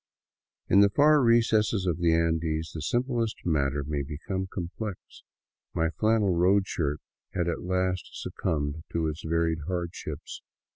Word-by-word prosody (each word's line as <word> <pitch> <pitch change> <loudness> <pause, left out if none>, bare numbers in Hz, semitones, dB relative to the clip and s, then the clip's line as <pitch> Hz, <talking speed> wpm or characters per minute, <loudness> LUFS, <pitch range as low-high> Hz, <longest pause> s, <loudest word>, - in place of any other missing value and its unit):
In 100 - +5
the 100 0 +7
far 150 +7 +5
recesses 115 -4 +3
of 90 -2 0
the 85 -1 +3
Andes 80 -1 0
the 80 - -5
simplest 120 - 0
matter 70 -4 +1
may 75 0 -2
become 80 +7 -4
complex. 95 +3 -4 0.8
My 80 0 +1
flannel 110 -1 +2
road 95 +3 +4
shirt 75 -5 -2 0.4
had 90 -2 0
at 85 - -2
last 90 0 -1
succumbed 75 0 -3
to 85 -1 0
its 75 +1 -4
varied 80 0 0
hardships. 85 -2 -5
85 Hz, 140 wpm, -28 LUFS, 80-100 Hz, 0.8 s, the